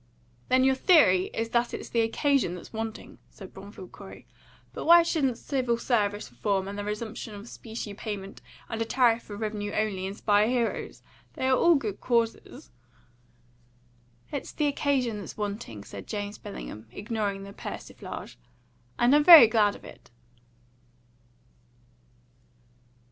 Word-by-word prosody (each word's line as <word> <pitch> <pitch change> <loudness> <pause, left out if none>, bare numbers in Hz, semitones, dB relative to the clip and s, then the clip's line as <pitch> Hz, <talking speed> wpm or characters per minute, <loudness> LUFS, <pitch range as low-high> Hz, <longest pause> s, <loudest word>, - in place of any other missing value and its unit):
"Then 255 0 +4
your 265 0 +4
theory 260 - +5
is 225 0 -4
that 235 +1 0
it's - - -8
the 230 - +1
occasion 235 - +1
that 180 - -8
is - - -15
wanting," 225 0 -6
said 190 -2 -13
Bromfield 195 -1 -11
Corey. 195 -1 -12 0.5
"But - - -6
why 340 +1 +8
shouldn't 280 -8 0
civil 255 -4 -1
service 205 - -1
reform, 190 +11 -1
and 200 - -6
the 205 - -4
resumption 210 +1 -5
of 205 +3 -10
specie 225 -3 -7
payment, 200 -2 -7 0.3
and 225 - -4
a - - +1
tariff 235 -1 +3
for 205 - -9
revenue 210 -1 -3
only, 195 -3 -1
inspire 205 +1 +2
heroes? 240 -1 -2 0.3
They 260 - -2
are 260 - +4
all 340 +5 +5
good 215 -8 -3
causes." 230 - -2 1.6
"It's 285 - -5
the 300 - 0
occasion 270 -6 0
that's - - -9
wanting," 200 - -5
said 100 0 -10
James 205 0 -5
Bellingham, 65 - -9
ignoring 205 - -3
the 200 0 -10
persiflage. - - -8 0.6
"And 245 +4 +4
I'm 295 - +5
very 330 -6 +11
glad 215 -2 +2
of - - -14
it." - - -14
220 Hz, 145 wpm, -27 LUFS, 200-245 Hz, 1.6 s, very